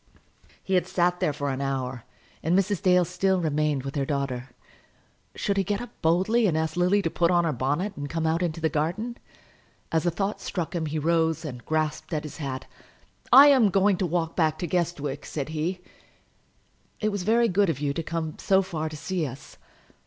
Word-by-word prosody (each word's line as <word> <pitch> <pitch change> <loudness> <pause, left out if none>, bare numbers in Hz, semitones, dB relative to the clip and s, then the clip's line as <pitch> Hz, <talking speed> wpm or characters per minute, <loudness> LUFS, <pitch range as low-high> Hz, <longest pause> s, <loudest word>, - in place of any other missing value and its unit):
He 190 - -3
had 180 -1 +2
sat 180 -1 +1
there - - +1
for 145 -1 -3
an 130 +1 -3
hour, 130 -3 -3 0.4
and 170 +4 +2
Mrs. 195 -1 +1
Dale 180 -1 +4
still 185 +2 +1
remained 150 -4 0
with 135 0 -5
her 140 - 0
daughter. 135 -2 -3 0.9
Should 200 -1 -1
he 195 - +3
get 205 +2 -1
up 245 - -7
boldly 190 +8 +3
and 160 -4 +1
ask 160 0 -1
Lily 180 +3 +2
to 165 - 0
put 170 -1 +2
on 175 -1 +3
her 160 -2 0
bonnet 145 - -1
and 145 0 -5
come 165 +1 -2
out 160 +2 +1
into 170 -2 -1
the 160 - +1
garden? 175 - -2 0.7
As 160 - +2
the 175 - +1
thought 195 +4 -2
struck 175 -4 -3
him, 165 -3 -2
he 155 +1 -3
rose 160 0 +1
and 125 -5 -7
grasped 155 +1 -1
at 150 - -2
his 150 - -8
hat. 135 -3 -4 0.7
"I 280 +2 +10
am 255 -7 +5
going 195 0 +3
to 185 - 0
walk 165 -1 -1
back 155 -2 +2
to 175 - -3
Guestwick," 155 -5 -2
said 145 -1 -4
he. 165 +4 -2 1.2
"It 215 - +1
was 205 -2 -3
very 230 +5 +3
good 200 -1 +2
of 145 -5 -1
you 145 -1 -1
to 165 - -2
come 160 -1 -4
so 195 0 +3
far 160 -4 -3
to 155 - -8
see 165 0 -2
us." 130 +1 -11
165 Hz, 205 wpm, -26 LUFS, 150-185 Hz, 1.2 s, I